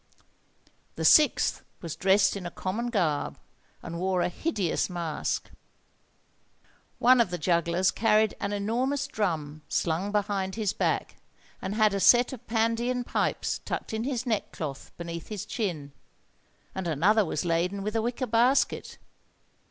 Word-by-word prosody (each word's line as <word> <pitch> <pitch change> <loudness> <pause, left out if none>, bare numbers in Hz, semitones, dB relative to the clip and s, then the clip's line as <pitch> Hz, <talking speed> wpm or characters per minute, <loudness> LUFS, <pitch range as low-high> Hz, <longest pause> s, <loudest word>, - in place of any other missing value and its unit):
The - - -3
sixth 305 -1 +5 0.2
was 165 -3 -6
dressed 190 0 +3
in 185 -3 -5
a - - -4
common 215 +8 -3
garb, 170 -10 0 0.5
and 170 0 -6
wore 185 0 +1
a - - +1
hideous 195 - -1
mask. 170 -4 -3 1.5
One 250 0 +6
of 225 - +1
the 175 - -3
jugglers 170 +2 +2
carried 215 -1 +3
an 200 - -2
enormous 245 +8 -1
drum 155 - -2
slung 175 +5 0
behind 200 -2 -1
his 215 -3 -1
back, - - -1 0.4
and 195 +2 -3
had 215 -2 +3
a 200 - 0
set 240 +7 +5
of 245 -1 -10
Pandean 230 +2 0
pipes - - -1
tucked - - -4
in 220 +1 -1
his 255 -1 -2
neckcloth 165 - -3
beneath 170 -1 -6
his 210 -3 -5
chin; 165 - -3 0.8
and 190 -2 -4
another 190 +8 +3
was 160 -2 -3
laden 175 +4 0
with 210 +2 -3
a 225 - +2
wicker 240 +3 -2
basket. 245 +4 +2
200 Hz, 145 wpm, -27 LUFS, 175-230 Hz, 1.5 s, One